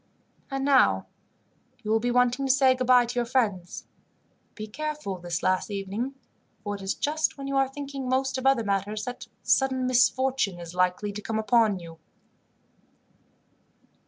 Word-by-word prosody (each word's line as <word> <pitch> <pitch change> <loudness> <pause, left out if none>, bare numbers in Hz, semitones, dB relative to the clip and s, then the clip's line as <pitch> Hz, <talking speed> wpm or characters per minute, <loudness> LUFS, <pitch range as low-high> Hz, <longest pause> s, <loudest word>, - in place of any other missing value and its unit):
"And 270 -1 -2
now, 275 -2 +4 0.8
you 215 - -2
will 225 - +4
be 245 +2 -1
wanting 250 +2 +2
to - - +4
say 265 -1 +5
goodbye 255 -1 +4
to 240 - -5
your 240 - 0
friends. 205 -9 -1 0.7
Be 215 - -6
careful 300 -4 -5
this 175 -1 -4
last 185 +2 +1
evening, 205 +7 -4 0.5
for 205 - -3
it 200 - -6
is 195 +1 -2
just 310 +1 -1
when 275 - -6
you 275 0 -3
are 270 -1 +2
thinking 275 -1 -6
most 260 0 0
of 260 - 0
other 270 -4 +3
matters, 205 +2 -2
that 245 -1 -7 0.2
sudden 260 -1 +2
misfortune 255 -5 +2
is 170 0 -8
likely 180 +3 0
to 205 +1 -7
come 220 +1 -3
upon 220 -2 +3
you." 165 -2 -11
245 Hz, 160 wpm, -26 LUFS, 200-265 Hz, 0.8 s, say